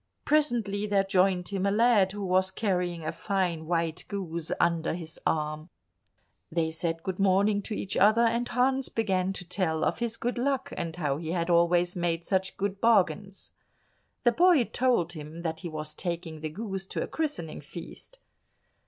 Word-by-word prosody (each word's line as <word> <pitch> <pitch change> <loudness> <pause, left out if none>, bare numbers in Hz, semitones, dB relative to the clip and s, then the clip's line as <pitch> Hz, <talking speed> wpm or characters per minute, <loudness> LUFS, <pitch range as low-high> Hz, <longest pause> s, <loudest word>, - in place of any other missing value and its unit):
Presently 235 -9 +1
there 200 -1 +3
joined 190 -2 +2
him 195 -2 -2
a 200 - +3
lad 210 -2 +4
who 205 0 -4
was 185 +1 +2
carrying 180 -5 -1
a - - -1
fine 180 -6 -1
white 165 -1 -1
goose 170 -5 -4
under 170 -1 +1
his 165 -2 -7
arm. 155 +1 -1 0.8
They 160 -1 0
said 165 0 -3
good 190 0 -4
morning 200 +2 +3
to 210 - -4
each 190 - -4
other, 215 +4 +5
and 235 +1 +1
Hans 260 +2 +1
began 190 -4 0
to 180 - -7
tell 165 -4 0
of - - 0
his 235 -1 -2
good 240 +1 -2
luck, 270 +1 -1
and 165 -1 -4
how 145 -5 -1
he 160 +1 -4
had 170 -1 0
always 175 +1 +3
made 170 -1 -1
such 190 0 0
good 200 0 -2
bargains. 205 -3 +2 0.7
The 240 - +5
boy 340 0 +5
told 235 -9 +1
him 155 +1 -8
that 160 -1 -2
he 175 - -6
was 155 -1 -5
taking 170 -2 -4
the 155 - -3
goose 195 +2 -5
to - - -2
a - - -5
christening 285 - -3
feast. 170 - -10
185 Hz, 175 wpm, -28 LUFS, 170-210 Hz, 0.8 s, other